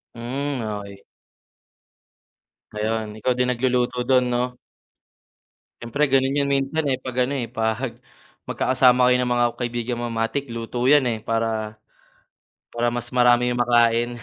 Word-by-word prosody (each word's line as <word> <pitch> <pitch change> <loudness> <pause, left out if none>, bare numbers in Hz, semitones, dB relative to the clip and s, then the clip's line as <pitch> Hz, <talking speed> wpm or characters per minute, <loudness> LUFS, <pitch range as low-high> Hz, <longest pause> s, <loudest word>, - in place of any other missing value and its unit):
Hmm, 130 +3 -3
okey. 100 -2 -6 1.7
Ayun, 110 +1 -2
ikaw 125 +4 +1
din 125 0 0
nagluluto 125 0 0
dun, 125 -1 +3
'no? 125 +1 -1 1.3
Siyempre 120 +6 -1
ganun 135 0 +3
yun 140 - +1
minsan, 140 +4 0
eh, 130 - +1
'pag 130 -2 -6
ano, 135 - -4
eh, 120 - -4
'pag 115 +3 -1 0.6
magkakasama 130 -1 +3
kayo 125 - +4
ng 125 -1 0
mga 120 0 +3
kaibigan 120 0 -3
mo - - -2
matik 115 +5 -2
luto 115 +1 -6
'yan, 145 -2 +5
eh, 115 - -2
para 110 -1 -2 0.9
para 120 0 -1
mas 120 0 -5
marami 125 -1 +4
yung 120 - -2
makain. 120 -1 +3
120 Hz, 140 wpm, -23 LUFS, 115-130 Hz, 1.7 s, yan